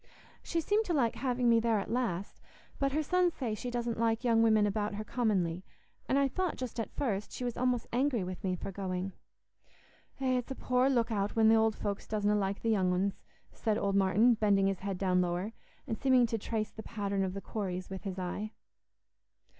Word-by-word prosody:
"She 335 - -1
seemed 415 +7 +2
to 345 - 0
like 240 -6 +2
having 250 0 0
me 230 -1 +6
there 225 -1 +2
at 200 +1 -3
last; 215 -6 -2 0.4
but 275 0 +1
her 310 +3 0
sons 360 +2 +2
say 240 -5 -2
she 245 +3 -4
doesn't 240 -2 -2
like 230 +1 +1
young 230 -2 +4
women 220 -2 +5
about 205 0 -1
her 215 - -4
commonly; 195 -7 0 0.5
and 270 - +3
I 280 0 +4
thought 365 +5 -1
just 250 -2 -5
at 225 - -2
first 210 -7 -2
she - - -6
was 245 -1 -2
almost 250 -2 0
angry 250 -4 +1
with 180 0 -6
me 185 -1 0
for 190 - -6
going." 185 0 -3 1.1
"Eh, 255 -1 +2
it's 245 - -7
a 265 - -4
poor 255 +1 +2
look 235 -3 +1
out 205 -1 -1
when 220 -1 +5
th' 225 - +6
ould 220 -1 +3
folks 200 -1 -4
doesna 210 -1 +1
like 200 -1 -1
the 225 - +2
young 190 -4 +2
uns," 190 +2 0 0.3
said 215 -2 -1
old 200 -2 0
Martin, 200 +5 +5
bending 205 -3 +3
his 195 -1 0
head 195 -1 -3
down 180 -1 +2
lower, 180 +5 -2 0.3
and 220 - -4
seeming 260 -3 +5
to 225 0 -1
trace 215 0 -2
the 220 - -8
pattern 200 -3 -2
of 190 0 -2
the - - -3
quarries 185 -4 -4
with 190 - -6
his 195 -2 -4
eye. 195 +4 -4
220 Hz, 215 wpm, -31 LUFS, 195-245 Hz, 1.1 s, me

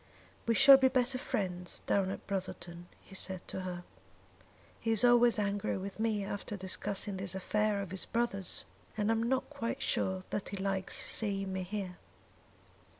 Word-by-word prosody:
"We 230 - +3
shall 275 +6 +10
be 265 -1 +5
better 255 0 +1
friends 180 -6 -2
down 195 -2 +2
at 195 - -5
Brotherton," 175 -3 -5
he - - -16
said 190 -1 -1
to 190 - -3
her. 180 -1 -5 1.0
"He 225 - -3
is 225 0 +3
always 240 -1 +6
angry 200 -1 0
with 195 +2 -6
me 220 -3 0
after 205 +1 -4
discussing 195 +1 -2
this 190 -1 -4
affair 210 +2 +1
of 185 - -9
his 190 - -2
brother's; 230 -6 -1 0.3
and 210 +1 +2
I - - +4
am 225 - 0
not 260 +4 0
quite 255 -5 -3
sure 190 0 +1
that 205 - -2
he 200 - -5
likes 190 -1 -1
seeing 195 -3 0
me 190 - -2
here." 185 -1 -5
200 Hz, 170 wpm, -33 LUFS, 190-225 Hz, 1.0 s, shall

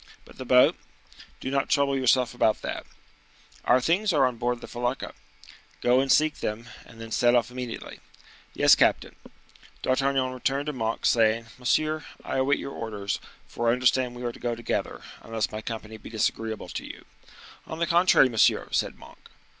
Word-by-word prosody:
"But - - -17
the 130 - -6
boat?" 125 0 +5 0.6
"Do 130 - -4
not 140 0 0
trouble 140 -2 +2
yourself 130 -2 +2
about 110 -3 +1
that." - - -5 0.8
"Our 125 - +5
things 180 +10 +1
are 145 -5 +4
on 125 -2 -1
board 120 0 -1
the - - -10
felucca." 120 +2 -3 0.7
"Go 125 +1 +3
and 135 0 +1
seek 155 0 +3
them, 115 +2 -4 0.2
and 115 - -15
then 115 0 -9
set 120 +1 +3
off 120 0 +1
immediately." 125 -2 -7 0.6
"Yes, - - +6
captain." - - +2 0.7
D'Artagnan 130 0 +1
returned 135 +2 -1
to 150 - -3
Monk, 115 -3 -3
saying,—"Monsieur, 120 +7 +1 0.2
I - - -2
await 135 +2 +2
your 140 - -6
orders, 105 -3 -4 0.3
for 120 0 -1
I - - +4
understand 125 0 +1
we 120 - -8
are 120 - -2
to - - -14
go 120 -1 -2
together, 120 - -3 0.2
unless 110 -4 -3
my 110 - -5
company 110 -1 -7
be - - -11
disagreeable 110 0 -2
to - - -5
you." - - -10 0.6
"On 160 - -6
the 170 - 0
contrary, 170 -5 +5
monsieur," 115 -4 +2
said - - -1
Monk. - - -16
125 Hz, 175 wpm, -26 LUFS, 115-135 Hz, 0.8 s, Yes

